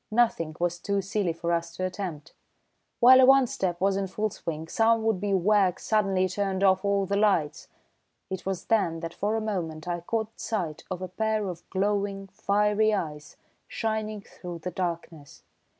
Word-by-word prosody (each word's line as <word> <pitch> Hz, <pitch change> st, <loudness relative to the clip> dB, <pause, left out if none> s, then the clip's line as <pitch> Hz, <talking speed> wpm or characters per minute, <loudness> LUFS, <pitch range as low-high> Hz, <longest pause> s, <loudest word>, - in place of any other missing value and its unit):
Nothing 215 Hz, -9 st, +1 dB
was 175 Hz, 0 st, -1 dB
too 200 Hz, +2 st, -1 dB
silly 195 Hz, -2 st, -1 dB
for 170 Hz, +1 st, -3 dB
us 170 Hz, 0 st, -1 dB
to 185 Hz, -, -2 dB
attempt. 180 Hz, -5 st, -5 dB, 0.7 s
While 260 Hz, +2 st, +9 dB
a -, -, +8 dB
one 270 Hz, 0 st, +7 dB
step 180 Hz, -7 st, -2 dB
was 195 Hz, +1 st, +2 dB
in 195 Hz, -1 st, -1 dB
full 215 Hz, +3 st, -2 dB
swing 160 Hz, -2 st, -5 dB
some 225 Hz, +3 st, +2 dB
would 220 Hz, -4 st, +1 dB
be 205 Hz, -1 st, -1 dB
wag 195 Hz, -1 st, +3 dB
suddenly 195 Hz, -4 st, +1 dB
turned 195 Hz, 0 st, -1 dB
off 190 Hz, 0 st, +4 dB
all 200 Hz, -1 st, +1 dB
the 200 Hz, +1 st, -1 dB
lights. 190 Hz, -8 st, +1 dB, 0.6 s
It 190 Hz, -1 st, -5 dB
was 190 Hz, -2 st, -3 dB
then 170 Hz, -8 st, +1 dB
that 165 Hz, 0 st, -5 dB
for 210 Hz, +2 st, -1 dB
a 225 Hz, -, -1 dB
moment 175 Hz, -7 st, -4 dB
I 175 Hz, -1 st, -1 dB
caught 220 Hz, +5 st, -3 dB
sight 175 Hz, -9 st, -3 dB
of 185 Hz, -1 st, -4 dB
a -, -, -3 dB
pair 215 Hz, +2 st, -1 dB
of 175 Hz, -2 st, -8 dB
glowing, 195 Hz, 0 st, -1 dB
fiery 210 Hz, +2 st, +2 dB
eyes 150 Hz, -5 st, -5 dB, 0.3 s
shining 215 Hz, -2 st, -3 dB
through 175 Hz, -3 st, -9 dB
the 180 Hz, -, -3 dB
darkness. 170 Hz, -4 st, -5 dB
195 Hz, 180 wpm, -27 LUFS, 175-210 Hz, 0.7 s, While